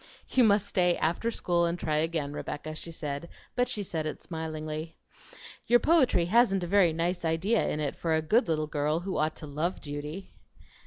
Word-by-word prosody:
"You 255 - +4
must 205 -2 +4
stay 180 -3 +2
after 170 +8 0
school 175 -6 +1
and 170 +1 -1
try 155 -3 -1
again, 155 -2 -1
Rebecca," 155 +1 -5
she 165 +2 -6
said, 150 0 -5 0.3
but 245 0 +1
she 210 - -1
said 160 -4 -3
it - - -6
smilingly. 155 -1 -5 0.7
"Your 240 0 +6
poetry 285 - +3
hasn't 195 -1 +3
a - - -1
very 190 -2 +4
nice 175 +2 -1
idea 170 +8 +1
in 150 - -2
it 145 -2 -2
for 165 -2 0
a 160 - +1
good 220 +9 +3
little 155 -2 0
girl 150 +2 -1
who 190 +1 -3
ought 155 +1 0
to - - -7
love 155 +5 -2
duty." 150 +5 -7
165 Hz, 195 wpm, -29 LUFS, 155-190 Hz, 0.7 s, Your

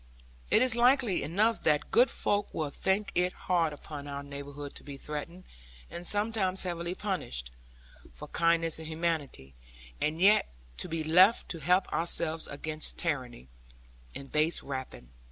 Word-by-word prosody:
It 225 - +5
is 255 -2 +1
likely 245 -4 +3
enough 215 +8 +1
that 150 -1 +1
good 250 +2 +5
folk 205 0 -1
will 150 -3 -2
think 195 +6 0
it 180 +1 +1
hard 170 -4 0
upon 145 0 -8
our 140 0 -5
neighbourhood 140 0 -8
to - - -10
be 140 -1 -8
threatened, 150 +6 -6 0.5
and 175 0 -6
sometimes 205 -3 +1
heavily 175 0 -3
punished, 65 - -3 0.6
for - - -9
kindness 165 -1 +1
and 160 - -7
humanity; 155 - -3 0.5
and 155 +2 0
yet 205 +4 +5 0.3
to - - -3
be 160 -1 -2
left 180 +8 +5
to 165 - -4
help 180 +5 +3
ourselves 165 -1 0
against 155 +2 -3
tyranny, 130 - -3 0.7
and 140 0 -8
base 155 +2 +2
rapine. 130 - -7
165 Hz, 150 wpm, -30 LUFS, 145-185 Hz, 0.7 s, It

